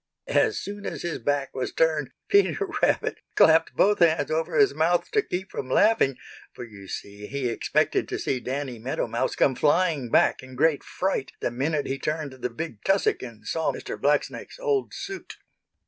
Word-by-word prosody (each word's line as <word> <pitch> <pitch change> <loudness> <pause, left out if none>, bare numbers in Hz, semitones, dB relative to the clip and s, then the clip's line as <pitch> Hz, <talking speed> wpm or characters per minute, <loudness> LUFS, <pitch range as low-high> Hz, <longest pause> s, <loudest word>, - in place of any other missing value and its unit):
As 430 - +2
soon 205 0 -6
as - - -5
his 170 -1 -3
back 145 -1 -1
was 130 - -3
turned 155 -4 +1 0.2
Peter 405 +1 +3 0.2
Rabbit - - +1 0.2
clapped 160 0 +5
both 205 +1 +3
hands 165 -2 +3
over 160 +2 -1
his 210 -8 +5
mouth 165 +4 +1
to 430 - +3
keep 190 - -5
from 130 - -5
laughing, 200 - +3 0.4
for - - -8
you 100 -4 -11
see 100 +2 -7
he 140 -2 -2
expected 115 - 0
to - - -2
see 130 - -1
Danny 130 -1 -4
Meadow 125 +4 -2
Mouse 115 0 -1
come 135 - +3
flying 150 -2 +2
back - - +3
in 130 0 -12
great 150 +2 +2
fright 185 -8 -2
the - - -1
minute 145 +4 -1
he 135 0 -3
turned 150 -1 -3
the 125 -1 -4
big 115 -3 -7
tussock 195 0 +2
and 115 -4 -10
saw 160 -1 0
Mr. - - -6
Blacksnake's - - -1
old 445 -5 0
suit. 390 -1 -7
150 Hz, 180 wpm, -25 LUFS, 130-175 Hz, 0.4 s, clapped